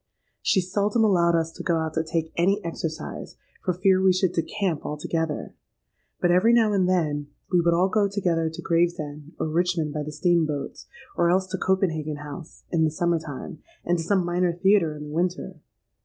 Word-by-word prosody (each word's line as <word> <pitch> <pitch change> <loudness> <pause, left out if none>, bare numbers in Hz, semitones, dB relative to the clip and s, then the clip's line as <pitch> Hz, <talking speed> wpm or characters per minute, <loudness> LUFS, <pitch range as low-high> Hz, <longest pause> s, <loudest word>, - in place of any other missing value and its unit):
She 190 - +3
seldom 205 +5 +1
allowed 170 -5 +3
us 165 0 0
to - - -9
go 170 - +1
out 160 -1 -2
to 160 - 0
take 160 0 -3
any 195 +4 +2
exercise, 165 -1 -5 0.3
for - - +1
fear 185 +1 +3
we 190 0 +5
should 185 0 +1
decamp 180 -1 -1
altogether; 150 +1 -3 0.7
but 175 - +2
every 190 +7 +4
now 225 -3 +4
and 185 -2 +2
then 150 -5 0 0.2
we 180 -2 +4
would 170 0 +3
all 180 +2 +3
go 205 +1 +2
together 175 -5 0
to 160 - -8
Gravesend 165 -3 -1
or - - -1
Richmond 165 -1 0
by 150 - -2
the 150 +1 -5
steam 165 +2 +2
boats, 145 -2 -5 0.3
or 170 0 +2
else 185 +2 +2
to - - -1
Copenhagen 160 -5 0
House, 150 +2 -10
in 165 -2 +2
the 160 - +3
summer 170 +2 0
time, 155 +3 -8 0.3
and 175 0 +1
to - - -2
some 190 +1 +1
minor 175 0 +1
theatre 175 -3 +3
in 150 - -8
the 150 0 -8
winter. 175 +2 -2
170 Hz, 195 wpm, -25 LUFS, 160-185 Hz, 0.7 s, we